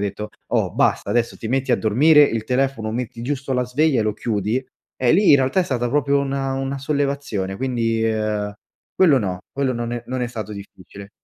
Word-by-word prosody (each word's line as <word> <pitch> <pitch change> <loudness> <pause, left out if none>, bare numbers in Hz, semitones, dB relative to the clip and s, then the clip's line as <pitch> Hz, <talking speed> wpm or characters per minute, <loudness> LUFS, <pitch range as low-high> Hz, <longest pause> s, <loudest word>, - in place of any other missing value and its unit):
detto: 105 +1 -4 0.2
“Oh - - +1
basta, - - +1
adesso 120 -1 0
ti 110 - -6
metti 135 0 0
a - - +4
dormire, 145 +8 +5
il 115 -6 +1
telefono 125 -4 -1
metti 115 -1 -5
giusto 135 +1 -3
la 125 -1 +1
sveglia 135 +2 +1
e - - +2
lo 105 - 0
chiudi” 110 +3 -2 0.4
eh, 125 - +4
lì 195 +3 +5
in 140 - +8
realtà 135 +7 +1
è - - +3
stata 120 -5 -1
proprio 140 +1 +2
una 135 -1 -2
una 135 +1 -3
sollevazione, 140 -9 -2
quindi, 115 -3 -1
ehm, 105 -2 -1 0.4
quello 155 -8 +5
no 95 -5 -3
quello 135 -2 0
non 120 0 -3
è 120 - -4
non 130 0 -3
è - - 0
stato 110 -3 -6
difficile. 100 0 -11
125 Hz, 205 wpm, -21 LUFS, 110-135 Hz, 0.4 s, in